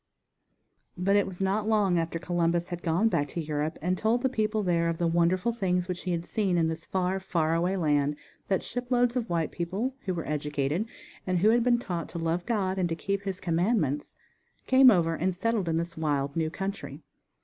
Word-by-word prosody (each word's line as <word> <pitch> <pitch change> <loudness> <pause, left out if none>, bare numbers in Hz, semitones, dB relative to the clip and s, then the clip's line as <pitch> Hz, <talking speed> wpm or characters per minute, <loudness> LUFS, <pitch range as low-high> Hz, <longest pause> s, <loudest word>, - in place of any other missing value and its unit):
_ - - -44 0.5
But 200 +1 +4
it 205 - +3
was 185 -2 -7
not 200 +3 0
long 200 -5 +3
after 165 0 -2
Columbus 175 0 0
had 175 -1 -5
gone 170 +6 +2
back 145 -9 +1
to 170 - -5
Europe 150 0 -2
and 180 +2 +1
told 230 +3 +1
the 265 - +3
people 215 -3 0
there 170 -2 +1
of 165 - -2
the 170 - 0
wonderful 175 +6 +2
things 180 -5 0
which 180 -1 -4
he 180 - -1
had 170 -1 -2
seen 195 -4 0
in 165 - +3
this 160 +1 -4
far, 190 0 0
far 165 -4 0
away 175 +3 +1
land 145 -3 +1 0.3
that 190 - 0
ship 245 0 -5
loads 245 -1 +2
of 240 -3 -2
white 165 -2 0
people, 190 +10 -2
who 185 - -1
were 165 - -4
educated 150 +5 -1 0.4
and 185 -1 +1
who 200 +5 +4
had 235 0 +3
been 245 0 +4
taught 175 -9 -4
to 170 - -7
love 165 +2 -1
God 195 -5 0
and 175 -2 +1
to 165 - -1
keep 200 +4 -2
His 195 -2 -4
commandments, 165 - 0 0.5
came 260 0 +7
over 170 -6 +3
and 180 +3 -1
settled 210 -2 0
in 165 - +1
this 170 0 -3
wild, 145 -3 -1
new 160 -1 0
country. 195 -5 -5
180 Hz, 215 wpm, -28 LUFS, 165-200 Hz, 0.5 s, came